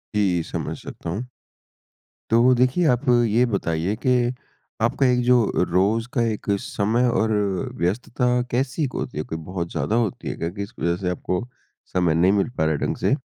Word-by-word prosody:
जी, 95 -5 +2
समझ - - -4
सकता 85 - -8
हूँ। 105 +9 -3 1.1
तो 120 +3 +5
देखिए 130 +8 +2
आप 125 +2 +2
ये 120 0 +4
बताइए 85 +2 -1
कि 125 -1 +3 0.5
आपका 130 +4 +2
एक 125 -1 +3
जो 125 0 +5 0.3
रोज 100 +6 +2
का 120 - +1
एक 110 -2 -1
समय 115 +5 0
और 110 -2 +1 0.5
व्यस्तता 115 +8 -1 0.3
कैसी 135 +4 0
होती 125 - -5
है? 75 - -1
कोई 80 - -5
बहुत 85 +1 -5
ज़्यादा 80 +8 -1
होती 115 -6 -1
है - - -3
क्या? 85 - -3
किस 100 +2 -7
वज़ह 85 +1 +1
से 90 - 0
आपको 90 +4 -2 0.5
समय 90 -3 +2
नहीं 90 +4 +4
मिल 100 +2 +1
पा - - +2
रहा 80 - +2
है 70 - -2
ढंग - - -1
से? - - +2
110 Hz, 180 wpm, -23 LUFS, 90-125 Hz, 1.1 s, तो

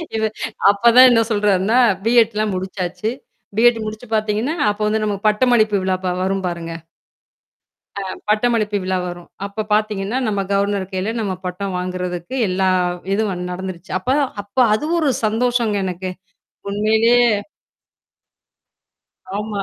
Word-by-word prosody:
இத 220 - -1 0.5
அப்ப 200 +2 -9
தான் 255 +1 +10
என்ன 230 -1 +4
சொல்றார்ன்னா 205 +2 +2 0.3
பி-எட்ல்லாம் 220 -3 +3
முடிச்சாச்சு. 190 +3 -3 0.5
பி-எட் 235 0 +5
முடிச்சு 215 +3 -7
பாத்தீங்கன்னா, 215 +6 0 0.2
அப்போ 205 +1 -2
வந்து 220 +1 0
நமக்கு 205 0 -1
பட்டமளிப்பு 215 -2 +3
விழா 185 0 +1
பா 180 - +1
வரும் 195 0 -1
பாருங்க? 170 -1 -5 1.3
அ, - - -3 0.3
பட்டமளிப்பு 215 -1 +1
விழா 185 0 -1
வரும். 175 -1 -7 0.2
அப்ப 200 +2 -4
பாத்தீங்கன்னா, 210 +1 0
நம்ம 205 -2 0
கவர்னர் 200 -1 0
கையில 190 +4 -2
நம்ம 205 -4 -2
பட்டம் 185 +1 -4
வாங்குறதுக்கு 180 +3 -4
எல்லா 190 +1 +1 0.5
இதும் 210 0 0 0.2
நடந்துருச்சு. 185 -1 -7
அப்ப 255 +8 0 0.3
அப்ப 200 +5 -34 0.2
அது 295 - -3
ஒரு 305 -4 +2 0.2
சந்தோஷங்க. 230 -1 +1
எனக்கு 185 0 -4 0.6
உண்மையிலயே 220 +4 +3 2.2
ஆமா. 210 -1 -4
210 Hz, 125 wpm, -19 LUFS, 190-220 Hz, 2.2 s, தான்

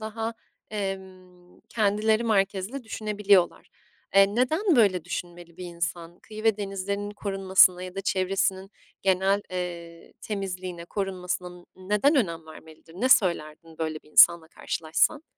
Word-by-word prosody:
daha 225 +1 -4 1.3
kendileri 215 +1 +1
merkezli 200 +4 0
düşünebiliyorlar. 205 -4 +1 0.5
Eee, 195 +1 +5
neden, 315 - +2
böyle, 195 -7 +3
düşünmeli 175 -1 -7
bir 180 - -8
insan? 170 0 -5
Kıyı 215 0 -10
ve 220 -2 +3
denizlerinin 200 0 -4
korunmasına 190 -3 +3
ya 185 0 -8
da 195 - -3
çevresinin 190 0 -1 0.3
genel, 195 +1 +2
eee, 170 -2 -6
temizliğine 185 -4 -5
korunmasına 180 -2 -4
n 175 0 -14 0.2
neden 210 +9 +3
önem 170 - 0
vermelidir? 160 +1 -15
Ne 245 +8 0
söylerdin 165 -7 +1
böyle 160 -1 -3
bir 150 - -22
insanla 170 +1 +6
karşılaşsan? 165 - -1
190 Hz, 120 wpm, -26 LUFS, 175-210 Hz, 1.3 s, insanla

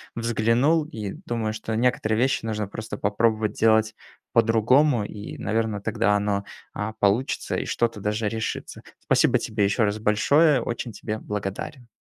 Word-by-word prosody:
взглянул 120 +7 +2
и 105 -8 -6
думаю, 115 -2 -2
что 110 0 -4
некоторые 115 -2 +1
вещи 130 -2 +1
нужно 105 -2 -2
просто 110 +1 -6
попробовать 110 +1 +1
делать 110 0 +3 0.4
по-другому 120 +3 +3
и, 105 0 -8
наверно, 110 -2 -1
тогда 105 0 +1
оно, 100 -1 0 0.3
а, 110 +1 -4
получится 105 +6 0
и - - -2
что-то 115 -3 -1
даже 105 +1 -1
решится. 110 0 -4 0.2
Спасибо - - +3
тебе 105 -2 -1
еще 105 +3 +1
раз 105 +1 0
большое, 135 +7 +3
очень 120 0 -4
тебе 110 +2 -5
благодарен! 105 +6 -5
110 Hz, 145 wpm, -24 LUFS, 105-115 Hz, 0.4 s, делать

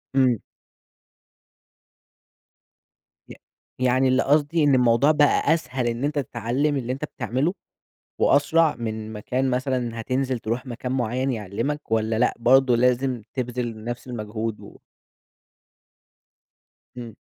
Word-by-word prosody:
إمم. 125 -4 +3 2.9
ي - - -9 0.4
يعني 130 +1 +3
اللي 130 +1 +3
قصدي 150 +2 +2
إن 145 -2 +4
الموضوع 125 +4 +4
بقى 150 +1 +3
أسهل 130 -6 -2
إن 120 +3 -2
أنت 145 0 0
تتعلّم 135 +4 -1
اللي 125 0 -2
أنت 140 +3 -4
بتعمله، 145 +6 -2 0.7
وأسرع 155 +3 +3
من 110 -1 -5
ما 105 - -7
كان 130 +4 -1
مثلًا 125 -3 -2
هتنزل 130 +2 -1
تروح 115 +4 -3
مكان 125 +1 -5
معيّن 130 +1 -1
يعلّمك 115 +7 -4
والّا 110 0 +1
لأ 125 - +2
برضه 130 +1 +4
لازم 125 0 +1
تبذل 120 -3 -4
نفس 120 +1 -5
المجهود 110 -1 -4
و - - -13 2.2
إمم. 115 -3 -8
125 Hz, 120 wpm, -24 LUFS, 115-135 Hz, 2.9 s, إن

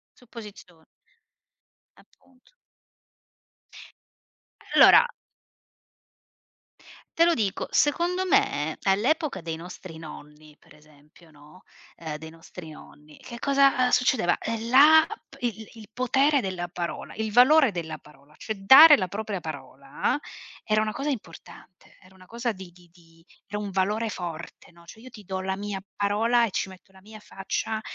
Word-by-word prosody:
Supposizion 210 -9 -14 1.1
Appunto. 255 - -27 2.2
Allora 485 - +8 2.1
te 335 - +5
lo 345 - +3
dico: 205 -6 -2
secondo 350 +5 +1
me 150 - +1
all'epoca 220 - 0
dei 165 -1 -5
nostri 175 0 -11
nonni, 150 -1 -13
per - - -21
esempio, 150 +2 -22
no, 150 +4 -19 0.3
ehm 155 -2 -7
dei 160 +1 -10
nostri 165 +1 -12
nonni, 150 0 -16
che 235 -1 -11
cosa 275 -2 +3
succedeva: 250 -9 +2
ehm, 225 0 -5
la 300 +5 +7 0.2
p - - -17
il 220 -3 -4
il 220 -2 -14
potere 265 +4 +1
della 185 -4 -4
parola 170 0 -6
il 220 -1 -4
valore 260 +2 +5
della 170 -3 -6
parola, 150 0 -21
cioè 220 - -5
dare 270 +10 +8
la 185 -3 -2
propria 205 0 -5
parola 140 - -4 0.5
era 215 0 +1
una 215 - -3
cosa 275 +7 -4
importante, 185 - -10
era 185 +1 -20
una 185 -1 -19
cosa 235 +1 -3
di 190 -3 -11
di 175 0 -21
di 165 -1 -23 0.2
era 205 +1 -5
un 205 -1 -5
valore 210 +4 -1
forte, 170 -2 -8
no. 170 0 -20
Cioè 220 - -14
io 255 +2 -13
ti 215 -4 -14
do 190 0 -5
la 190 0 -3
mia 205 -1 -5
parola 225 +4 +1
e 210 - -6
ci 190 - -3
metto 190 +1 -17
la 190 0 -19
mia 215 +2 -13
faccia 215 +2 -5
195 Hz, 145 wpm, -25 LUFS, 170-235 Hz, 2.2 s, Allora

